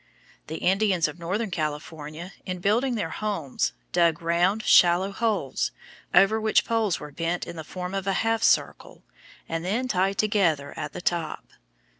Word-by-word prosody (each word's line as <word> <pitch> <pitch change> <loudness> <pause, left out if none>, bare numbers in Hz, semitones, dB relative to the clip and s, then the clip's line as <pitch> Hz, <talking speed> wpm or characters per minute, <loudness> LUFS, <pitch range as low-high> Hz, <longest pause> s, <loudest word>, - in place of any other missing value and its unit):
The 160 - -5
Indians 190 -2 +2
of 155 +3 -9
northern 195 +5 -2
California 155 +2 -5
in 185 -1 -4
building 230 +8 +1
their 185 -7 -2
homes 205 - -2 0.2
dug 170 -2 +3
round, 175 +6 +2
shallow 180 +3 +5
holes, 205 - -1 0.4
over 195 +5 +5
which 220 0 +3
poles 225 -5 0
were 150 - -9
bent 165 +4 -2
in - - -8
the 160 - -6
form 180 +3 -6
of 195 -1 -3
a 195 - +2
half 225 0 +1
circle, - - +1 0.4
and 165 0 -3
then 225 +8 -1
tied 195 -3 +1
together 175 -10 +1
at 150 -2 -5
the - - -6
top. 170 -3 -2
180 Hz, 160 wpm, -26 LUFS, 165-210 Hz, 0.4 s, shallow